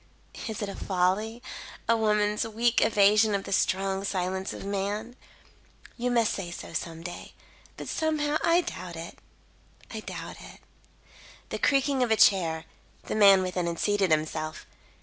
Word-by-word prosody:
"Is 220 -1 -4
it - - -2
a 200 - -6
folly? 200 +6 0 0.4
A 230 - +4
woman's 210 -1 +2
weak 230 +2 +2
evasion 210 0 +4
of 195 - -2
the - - -8
strong 190 +1 +1
silence 190 0 -2
of - - -7
man? 205 +4 -3 0.8
You 250 +1 -1
may 235 -2 +3
say 195 -4 -2
so 175 - -8
some 165 0 -4
day; 175 0 -8 0.4
but - - -7
somehow, 305 -1 0
I 340 +1 +4
doubt 180 - -7
it 165 +1 -8 0.7
I - - -5
doubt - - -7
it." - - -12 0.9
The - - -4
creaking 275 -1 +2
of 245 - +2
a 220 - +4
chair; 165 -6 +4 0.4
the - - -4
man 195 -3 +7
within 180 -1 -2
had 170 0 -2
seated 205 -1 +1
himself. 155 0 -1
200 Hz, 155 wpm, -27 LUFS, 180-225 Hz, 0.9 s, man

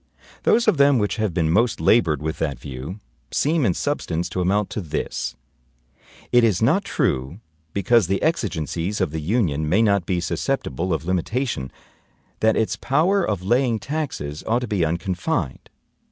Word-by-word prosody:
Those 235 +1 +3
of 205 -7 +4
them 140 -1 +5
which 105 0 0
have 110 -3 0
been 80 -2 +1
most 115 +6 +2
labored 80 - +3
with 80 0 -3
that 70 -3 -1
view, 70 +9 -7 0.3
seem 155 +1 +1
in 90 - +1
substance 90 - -2
to 90 +2 -2
amount 100 +3 +1
to 105 - -3
this: 80 -3 -3 1.0
"It 120 -1 +5
is 105 -5 +3
not 155 - +3
true, 85 - -1 0.3
because 110 0 +3
the 95 +1 0
exigencies 95 - -1
of 95 -6 0
the 80 0 -3
Union 80 - 0
may 100 +7 +4
not 100 -5 +2
be 90 -2 +1
susceptible 90 - -2
of 80 -1 -1
limitation, 95 - -1 0.7
that 110 0 +3
its 110 - +1
power 175 +8 +2
of 100 - -2
laying 120 +3 +2
taxes 130 - -4
ought 120 +2 +2
to 125 - -3
be 100 -5 0
unconfined. 85 - -2
100 Hz, 165 wpm, -22 LUFS, 80-125 Hz, 1.0 s, them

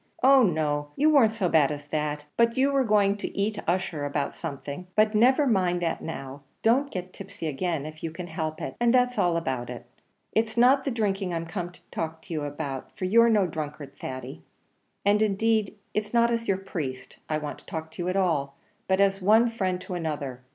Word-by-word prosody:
Oh 270 +1 +7
no! 155 -7 +1
you 305 +2 +4
weren't 260 -8 +5
so 220 -5 0
bad 150 -4 +4
as 145 -1 -6
that; 150 -1 -2
but 235 0 +2
you 270 +2 +3
were 275 -1 +3
going 205 -3 +3
to - - -6
eat 205 +1 0
Ussher 175 -4 -1
about 145 0 -2
something. 140 +5 -6
But 215 +1 +4
never 255 +7 +4
mind 180 -7 +1
that 165 - -1
now; 135 -3 -6 0.2
don't 260 +5 +3
get 185 -4 -6
tipsy 195 -3 -8
again, 155 0 -2
if 155 0 -9
you 165 - -1
can 170 +3 -7
help 160 -2 -4
it, - - -5
and 240 -1 +4
that's 250 0 +3
all 175 -1 +2
about 130 -7 -3
it. 120 -1 -7 0.5
It's 220 +1 0
not 265 +3 +5
the - - +1
drinking 195 -6 -1
I'm 165 0 -3
come 175 +1 -4
to - - -16
talk 160 0 -4
to - - -7
you 155 - -1
about; 145 -2 -5
for 185 - -2
you're 230 +5 +5
no 210 -4 +4
drunkard, 150 -3 -6
Thady; 130 0 -7 0.6
and 205 +1 +4
indeed 215 0 +1 0.2
it's 215 +2 -2
not 235 0 +4
as 230 0 -1
your 195 - +2
priest 135 -9 -6
I 155 - +1
want 150 -1 -5
to - - -19
talk 160 0 -5
to 170 - -7
you 175 - -1
at 185 - -1
all, 145 -7 0 0.3
but 190 0 +2
as 195 0 +3
one 220 +5 +5
friend 185 -5 -1
to 185 - -7
another. 145 -7 -4
185 Hz, 215 wpm, -26 LUFS, 155-220 Hz, 0.6 s, Oh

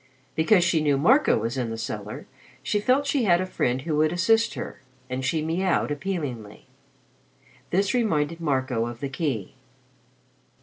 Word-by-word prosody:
Because 175 +3 +4
she 170 -2 +2
knew 145 -2 +2
Marco 260 - +4
was 115 +4 -2
in 120 -2 -2
the 115 - -4
cellar, - - -6 0.4
she 205 - 0
felt 255 +7 +2
she 280 -4 +1
had 175 -3 +4
a 185 - -1
friend 130 -7 -1
who 155 -1 -1
would 155 0 +3
assist 225 +7 +2
her, - - -7 0.3
and 130 +1 -2
she 155 +4 0
miaued 170 0 0
appealingly. 145 - -4 1.0
This 190 +2 +1
reminded 165 -9 0
Marco 130 -6 0
of 120 0 -7
the 140 - -3
key. 135 - -3
155 Hz, 160 wpm, -25 LUFS, 130-190 Hz, 1.0 s, Because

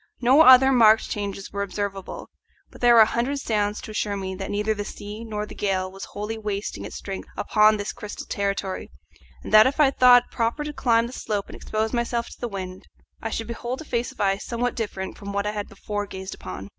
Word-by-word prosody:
No 255 +5 +5
other 265 -2 +8
marked 225 -3 +5
changes 200 -1 -4
were 200 - -2
observable, 200 -1 -5 0.4
but - - -15
there 240 -1 +6
were 230 - +9
a - - +8
hundred 240 +6 -1
sounds 210 -4 -1
to - - -8
assure 210 -1 -2
me 190 -1 -4
that 195 +1 -6
neither 210 +1 0
the 205 -1 -4
sea 210 +2 -8
nor 210 -2 -4
the - - -11
gale 185 -2 -1
was 195 0 -8
wholly 210 +2 -5
wasting 200 - -4
its 105 - -8
strength 195 -1 -6
upon 215 +1 +4
this 205 0 -4
crystal 210 -3 -8
territory, 200 -1 -3 0.5
and - - -7
that 215 +2 +9
if 280 +4 -2
I 285 -3 +5
thought 250 -2 +6
proper 235 +5 -1
to 295 0 -5
climb 230 -4 +2
the 240 - -8
slope 205 -5 -3
and - - -9
expose 220 +2 -2
myself 235 -1 -1
to - - -14
the 240 - -1
wind, 185 -3 -7 0.3
I 225 - -3
should 225 +1 -3
behold 240 +2 -5
a - - -9
face 240 -3 -2
of - - -20
ice 195 0 +1
somewhat 245 +1 -2
different 200 -4 -5
from 200 -1 -7
what 200 0 -1
I 210 - 0
had 205 -1 -5
before 205 -1 -4
gazed 190 0 -7
upon. 95 +2 -8
210 Hz, 225 wpm, -24 LUFS, 200-235 Hz, 0.5 s, were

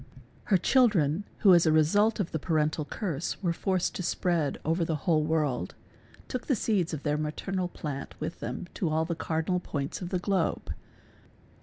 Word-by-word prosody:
Her 195 - +4
children, 195 - +3 0.2
who, 195 -3 +7
as 170 -1 +5
a - - +5
result 205 +9 +3
of 195 - -1
the 160 - -2
parental 155 -1 0
curse, 170 -1 -3
were 170 -2 +2
forced 185 0 0
to - - -4
spread 170 -4 0
over 165 +2 +1
the 160 -1 -1
whole; 155 -3 +3
world, 150 - -1 0.5
took 255 - -4
the 270 - +3
seeds 200 -6 0
of 155 -4 -5
their 150 0 0
maternal 180 +5 -2
plant 145 -5 -6
with 155 +2 -4
them - - -4
to 175 - -1
all 160 +1 +1
the 170 - -2
cardina 160 +2 -1
L - - -1
points 145 -3 -4
of 175 - -4
the 185 - 0
globe. 185 -2 -1
165 Hz, 185 wpm, -28 LUFS, 155-185 Hz, 0.5 s, who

